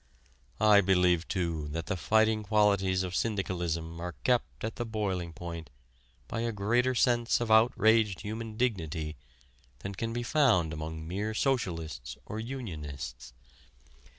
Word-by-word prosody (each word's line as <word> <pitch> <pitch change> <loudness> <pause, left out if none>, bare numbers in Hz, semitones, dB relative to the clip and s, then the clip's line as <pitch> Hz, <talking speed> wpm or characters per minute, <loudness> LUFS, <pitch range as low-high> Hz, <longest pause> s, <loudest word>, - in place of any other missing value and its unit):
I 105 -1 +7
believe 90 -3 +3
too 85 -5 -2
that 85 0 -3
the 95 - -2
fighting 110 +3 +3
qualities 100 -3 +2
of 90 -1 -4
syndicalism 85 -6 -2
are 90 -2 -5
kept 65 0 0
at 110 - -4
the 120 - -1
boiling 100 -6 -2
point 85 -2 -7 0.6
by 115 - -3
a 115 0 0
greater 120 +5 +1
sense 120 -1 +3
of 120 -2 -1
outraged 110 -2 +4
human 110 +1 -5
dignity 80 -10 -1 0.7
than 95 - -5
can 115 +4 -3
be 120 +1 -2
found 115 - +3
among 80 0 -5
mere 105 +5 -2
socialists 80 - -2
or 110 - -5
unionists. 75 - -6
95 Hz, 135 wpm, -30 LUFS, 85-110 Hz, 0.7 s, I